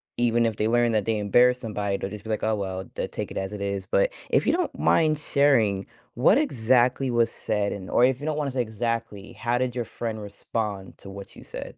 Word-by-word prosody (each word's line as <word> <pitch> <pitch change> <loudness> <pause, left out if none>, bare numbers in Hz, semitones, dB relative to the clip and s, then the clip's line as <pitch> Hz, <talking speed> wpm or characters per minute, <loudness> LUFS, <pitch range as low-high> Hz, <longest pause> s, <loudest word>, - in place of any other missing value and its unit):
even 120 -1 +2
if 110 -2 0
they 110 +1 0
learn 120 -1 +3
that 105 -2 +2
they 115 -1 0
embarrass 120 +5 +4
somebody, 105 -4 -2
they'll 95 - -4
just 105 0 -8
be 110 - -9
like, 110 - -2
"Oh, 110 0 +2
well" 95 -2 -4
they'll - - -2
take - - -5
it - - -6
as 95 +1 -3
it 105 - -6
is, 100 -1 -2
but - - +1 0.2
if - - +2
you - - +4
don't 350 -2 -1
mind 155 -2 +3
sharing, 120 -10 +2 0.3
what 145 - +4
exactly 125 - +2
was 120 -1 +3
said, 105 -2 -2
and 95 -2 -8
or 120 - +4
if 130 +1 0
you - - -5
don't 155 -1 -1
wanna 145 -3 -1
say 130 - 0
exactly, 115 -2 -3
how 120 +3 -1
did 125 -1 -1
your 120 -2 -2
friend 110 -1 -5
respond 100 -1 -5
to 100 - -11
what 100 0 -10
you - - -12
said? - - -8
115 Hz, 240 wpm, -25 LUFS, 100-125 Hz, 0.3 s, embarrass